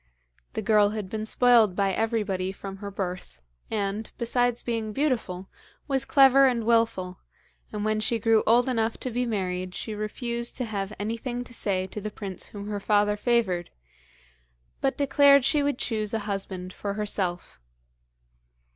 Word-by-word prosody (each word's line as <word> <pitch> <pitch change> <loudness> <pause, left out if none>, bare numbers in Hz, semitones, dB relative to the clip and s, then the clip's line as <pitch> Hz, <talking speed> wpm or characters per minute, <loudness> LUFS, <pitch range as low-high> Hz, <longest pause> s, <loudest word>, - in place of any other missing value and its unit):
The - - -3
girl 210 -2 +4
had 200 -3 -5
been 220 0 -3
spoiled 230 -6 +4
by 195 -1 +1
everybody 210 -4 -1
from 195 0 -8
her 200 0 -6
birth, 180 - -5 0.3
and, 210 0 -2
besides 245 0 0
being 225 -2 -2
beautiful, 225 -10 -1 0.4
was 270 -3 0
clever 270 0 +6
and 235 -3 0
wilful, 225 -6 +1 0.5
and 210 -1 -3
when 215 0 +1
she 225 +2 +1
grew 225 0 +3
old 240 +3 +5
enough 225 -3 0
to 255 - -3
be 245 +1 -1
married 185 -4 -2
she 220 - -4
refused 235 +3 -3
to 250 - -2
have 200 -3 -3
anything 230 +4 -3
to 245 - -13
say 190 -5 -1
to 200 +3 -7
the 215 - -3
prince 195 -3 -7
whom 200 -1 -8
her 205 -1 -3
father 205 0 +2
favoured, 210 -6 0 1.1
but 270 - 0
declared 280 -1 +5
she 295 +1 +3
would 285 -3 0
choose 215 -3 -2
a - - 0
husband 190 -2 -4
for 200 -1 -4
herself. 190 - -3
215 Hz, 160 wpm, -26 LUFS, 195-235 Hz, 1.1 s, clever